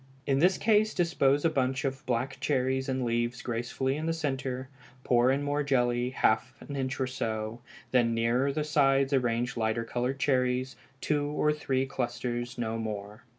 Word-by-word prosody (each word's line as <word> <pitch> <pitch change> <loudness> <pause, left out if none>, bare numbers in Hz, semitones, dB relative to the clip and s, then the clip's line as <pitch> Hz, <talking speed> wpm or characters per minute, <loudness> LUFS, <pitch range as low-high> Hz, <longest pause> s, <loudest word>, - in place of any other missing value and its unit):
In 135 -1 +2
this 180 +5 +4
case 215 0 +3
dispose 145 -5 +2
a - - +5
bunch 130 -1 0
of 135 +1 -3
black 130 +2 -1
cherries 130 -1 0
and 130 -1 -1
leaves 120 +1 -1
gracefully 125 +3 -2
in 155 +1 -3
the 165 - +1
centre, 135 -4 -3 0.4
pour 120 0 +4
in 135 +2 +1
more 145 +1 0
jelly, 125 -3 +1
half 125 0 +1
an 140 - -8
inch 130 0 -2
or 130 - +1
so, 115 -3 -3 0.3
then 120 -2 +3
nearer 120 +4 +2
the 150 +2 -1
sides 140 -2 +3
arrange 120 -1 +1
lighter 110 +1 0
colored 125 +3 -2
cherries, 130 -1 +1 0.3
two 145 -1 0
or 150 +1 +1
three 135 -3 -1
clusters, 120 -2 -3
no 115 -1 -2
more. 105 0 -6
130 Hz, 170 wpm, -29 LUFS, 120-140 Hz, 0.4 s, a